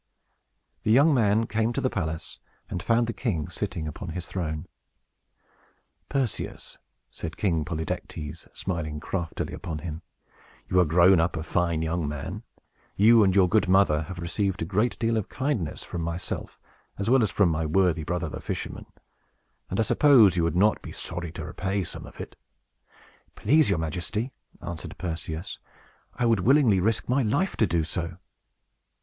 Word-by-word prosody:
The - - -2
young 145 +7 +6
man 110 -3 +3
came 115 +2 0
to - - -1
the - - +1
palace, 80 -4 -4 0.3
and 90 - -2
found 115 +4 +2
the 115 - -3
king 90 - -2
sitting 80 -2 -3
upon 75 - -6
his 90 -1 -5
throne. 80 -3 -4 1.4
"Perseus," 135 -5 -2 0.3
said 80 -1 -6
King 85 -6 +1
Polydectes, 80 0 -5
smiling 80 -5 -3
craftily 85 +1 -4
upon 80 - -5
him, 80 -1 -5 0.7
"you 90 - +3
are 90 - +5
grown 85 +3 +5
up 85 +1 +1
a 80 - -3
fine 85 -2 0
young 80 -1 -1
man. 75 -1 -5 0.5
You 110 +2 +6
and 95 -1 +3
your 95 -2 +6
good 105 0 +2
mother 95 -6 +4
have 85 +3 -7
received 90 +2 -1
a - - -2
great 105 +7 0
deal 115 -1 +1
of 105 - -2
kindness 130 - -2
from 85 - -5
myself, 85 +2 -4 0.4
as 100 - -3
well 130 +2 +5
as 110 - +2
from 90 +1 +3
my 80 0 0
worthy 85 -1 +2
brother 90 +2 -2
the - - -6
fisherman, - - -5 0.8
and 95 - -2
I - - +5
suppose 115 - +6
you 85 - +2
would 85 +1 0
not 105 +4 +3
be - - -8
sorry 85 -1 -3
to 85 - -6
repay 95 +4 -2
some - - -7
of - - -14
it." - - -7 1.0
"Please 150 +7 +4
your - - +2
Majesty," 90 - -3 0.3
answered 85 -2 -6
Perseus, 80 -1 -5 0.6
"I 120 - 0
would 115 -3 +3
willingly 120 -2 +4
risk 110 +4 +1
my 130 +3 +2
life 140 - 0
to - - +3
do 85 -1 +1
so." 85 +1 -4
90 Hz, 165 wpm, -26 LUFS, 80-110 Hz, 1.4 s, young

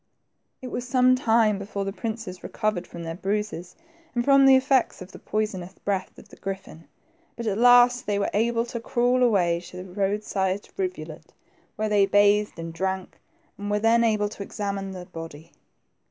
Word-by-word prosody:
•It 255 - -6
was 245 0 -4
some 255 0 +4
time 225 -5 +3
before 200 0 -4
the 195 - -3
princes 215 -2 -5
recovered 215 -5 -2
from 170 - -8
their 165 0 -4
bruises, 195 -1 -3 0.4
and 240 0 0
from 275 -1 +6
the 265 - +8
effects 260 -1 +2
of 185 +1 -10
the - - -12
poisonous 195 -4 -3
breath 195 -2 -2
of - - -15
the - - -15
griffin, 190 -4 -7 0.5
but 235 - -6
at 210 -1 -1
last 245 +1 +6
they 205 -1 +1
were 200 - -1
able 230 +2 +1
to 235 0 -5
crawl 245 +2 +1
a^ay 180 -8 +2
to 180 - -8
a - - -7
roadside 195 0 -2
rivulet, 370 -2 -5 0.4
where 215 - -1
they 205 -2 +4
bathed 205 +1 +3
and 165 0 -6
drank, 190 +1 -3 0.4
and 205 0 -4
were 210 - +1
then 225 +2 +3
able 215 -2 +2
to 210 - -10
examine 200 -1 -4
the 185 -2 -8
body. 165 -1 -10
205 Hz, 180 wpm, -25 LUFS, 190-235 Hz, 0.5 s, the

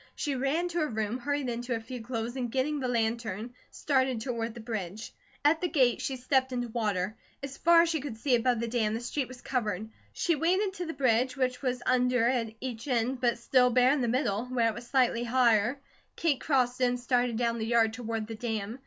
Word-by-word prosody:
She 290 - -2
ran 275 +7 0
to 345 0 -2
her 305 - +1
room, 220 +1 -2
hurried 285 +1 -1
into 240 0 -2
a - - -2
few 245 +2 -7
clothes, 230 +1 -4
and 245 -3 -3
getting 285 +4 0
the 260 - -2
lantern, 230 -1 -2 0.2
started 260 -4 0
toward 230 -1 -3
the - - -8
bridge. 220 -2 -5 0.3
At 315 +2 +4
the 360 - +1
gate 260 -8 +2
she 270 - -2
stepped 260 +1 +1
into 245 -1 -2
water. 210 -3 -1 0.3
As 275 0 -5
far 335 0 +6
as 340 - 0
she 320 -3 -1
could 265 -6 -6
see 255 +3 0
above 245 0 +2
the 235 - -2
dam 220 -2 0
the - - -2
street 255 +2 -2
was 255 -1 -12
covered. 220 -4 -2 0.2
She 345 - 0
waded 370 +6 +1
to 360 -3 -5
the 325 - -4
bridge, 255 0 +1
which 255 -1 0
was 250 -2 -2
under 250 -2 +3
at 230 -3 -1
each 245 -1 -6
end 250 0 0
but 240 -2 +2
still 250 +1 +3
bare 250 +1 +4
in 290 - 0
the 240 - +1
middle, 235 -3 0
where 245 -2 +1
it - - -3
was 240 - -9
slightly 245 -3 +2
higher. 240 0 +3 0.4
Kate 310 -6 0
crossed 255 -3 +1
it - - +5
and 245 0 0
started 245 -1 +1
down 235 -1 0
the - - -2
yard 230 -2 +3
toward 225 -2 -3
the 225 - -7
dam. 225 0 -4
245 Hz, 225 wpm, -29 LUFS, 230-265 Hz, 0.4 s, far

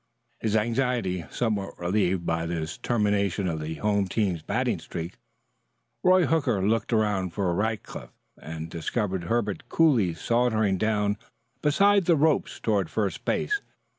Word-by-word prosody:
His 110 -1 0
anxiety 115 -5 0
somewhat 105 -5 -2
relieved 90 0 0
by 85 0 -1
this 80 -2 -4
termination 100 -4 +1
of 80 -2 -2
the 80 +1 -4
home 100 0 +1
team's 95 -4 0
batting - - -1
streak, 85 +2 -6 0.9
Roy 185 -1 +5
Hooker 125 -12 +1
looked 115 +2 0
around 105 -5 +1
for 95 -3 0
Rackliff, 110 +4 -3 0.3
and 80 0 -7
discovered 90 +2 -2
Herbert 105 0 -1
coolly 120 - +3
sauntering 110 -1 +1
down 105 -1 +1 0.4
beside 195 +6 +4
the 170 - +5
ropes 155 0 +1
toward 100 -6 0
first 105 -3 -2
base. 415 -1 0
105 Hz, 135 wpm, -26 LUFS, 90-120 Hz, 0.9 s, Roy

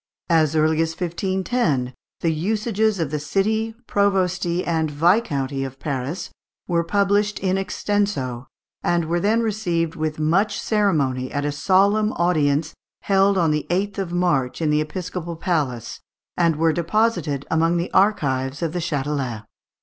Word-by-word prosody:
As 160 -2 +3
early 155 +1 +3
as 165 0 0
1510, 180 - -1 0.3
the 165 - +2
"Usages 215 +4 0
of 160 -4 -1
the 150 - -1
City, 220 +8 0
Provosty, 185 -3 +1
and 160 -2 0
Viscounty 145 - +1
of 135 0 -6
Paris," 140 +3 -4 0.4
were 170 -1 +1
published 205 +3 +1
in 190 -1 0
extenso, 195 -10 -1 0.3
and 170 -1 +1
were 170 +2 0
then 215 +5 +2
received 175 -7 -1
with 155 -1 -2
much 180 +7 +1
ceremony 145 - 0
at 145 0 -2
a 145 - 0
solemn 195 +8 +2
audience 155 -3 +1 0.3
held 195 0 +3
on 165 -4 +3
the 150 0 -1
8th 195 +3 -1
of 190 -3 -3
March 175 -8 0
in 155 -2 +1
the 150 0 +3
episcopal 175 +1 -5
palace, 145 -9 -2 0.4
and 170 -2 +2
were 160 +1 +2
deposited 170 -5 0
among 165 +2 +2
the 170 +1 -3
archives 145 -8 +1
of 165 -1 -1
the 180 - -1
Châtelet 140 -7 -2
(Fig. - - -28
170 Hz, 150 wpm, -22 LUFS, 150-195 Hz, 0.4 s, As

